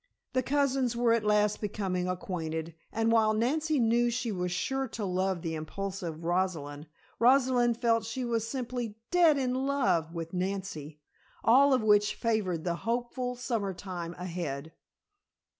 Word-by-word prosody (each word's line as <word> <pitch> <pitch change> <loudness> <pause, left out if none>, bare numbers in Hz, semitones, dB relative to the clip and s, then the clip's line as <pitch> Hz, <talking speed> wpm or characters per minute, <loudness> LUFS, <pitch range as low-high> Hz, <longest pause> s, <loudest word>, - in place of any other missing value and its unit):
The 255 - +2
cousins 270 -3 +1
were 235 -1 +3
at 230 -2 +1
last 210 0 +2
becoming 190 -4 -2
acquainted, 165 -3 -3 0.2
and 225 +1 +1
while 220 -1 +4
Nancy 300 +7 +1
knew 235 +1 +3
she 240 -1 -2
was 180 -2 -2
sure 265 +9 -1
to 220 -3 -5
love 185 -1 -1
the 165 - -2
impulsive 170 0 -5
Rosalind, 165 -5 -1 0.3
Rosalind 245 -1 +4
felt 230 -1 +2
she 245 +3 -3
was 230 -2 -1
simply 245 -3 -4 0.2
"dead 340 -4 +5
in 255 -2 0
love" 255 - +1
with 165 0 -6
Nancy, 180 -5 -4 0.4
all 270 +5 +6
of 255 -4 +3
which 210 -1 +4
favored 200 -8 -1
the 170 -1 -1
hopeful 245 +3 -2
summertime 195 -8 -4
ahead. 165 -5 -5
215 Hz, 140 wpm, -29 LUFS, 180-245 Hz, 0.4 s, all